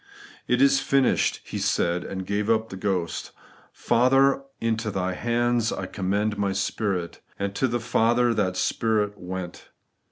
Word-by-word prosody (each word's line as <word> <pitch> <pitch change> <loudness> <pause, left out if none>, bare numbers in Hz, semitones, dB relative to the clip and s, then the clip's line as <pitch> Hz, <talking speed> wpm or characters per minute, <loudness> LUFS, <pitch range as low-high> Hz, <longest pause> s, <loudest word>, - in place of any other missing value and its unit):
' - - -20
It - - +3
is 275 -1 +5
finished,' 135 - +2
He - - -5
said, 85 +1 0
and 95 -1 -5
gave 100 +2 -1
up 110 0 +2
the - - -7
ghost 95 -3 -2 0.4
'Father, 135 +3 +3 0.2
into 110 -1 -1
Thy 95 -2 -2
hands 120 +2 0
I - - -3
commend 100 +2 -1
my 100 -1 0
spirit;' 95 -2 -2 0.2
and 100 0 -3
to 130 - +1
the 120 0 -1
Father 120 +1 +2
that 95 -4 0
spirit 105 +1 0
went. 90 -1 -7
105 Hz, 155 wpm, -25 LUFS, 95-120 Hz, 0.4 s, is